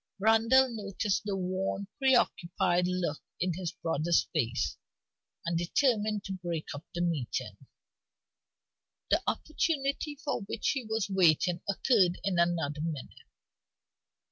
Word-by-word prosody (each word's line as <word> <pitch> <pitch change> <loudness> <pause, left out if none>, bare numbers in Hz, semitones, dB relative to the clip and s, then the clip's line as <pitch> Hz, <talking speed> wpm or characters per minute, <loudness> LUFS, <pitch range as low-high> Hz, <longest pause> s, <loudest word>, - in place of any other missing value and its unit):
Randal 225 +5 +5
noticed 210 -2 -2
the 200 -2 -1
worn, 190 +1 -2
preoccupied 180 -8 +2
look 180 -4 -2 0.2
in 180 0 0
his 175 0 -3
brother's 165 +1 +1
face, 115 -1 0 0.7
and 170 0 -1
determined 215 +2 +1
to 195 - -5
break 170 -3 -3
up 145 +2 -7
the 175 - -1
meeting. 165 -8 -2 1.6
The - - +4
opportunity 295 -1 -1
for 285 -4 -3
which 200 +2 -2
he 270 -3 0
was 220 -1 -1
waiting 180 -2 +3
occurred 195 -3 +3
in 190 -3 0
another 165 -4 +1
minute. 155 -4 -5
190 Hz, 115 wpm, -30 LUFS, 170-220 Hz, 1.6 s, Randal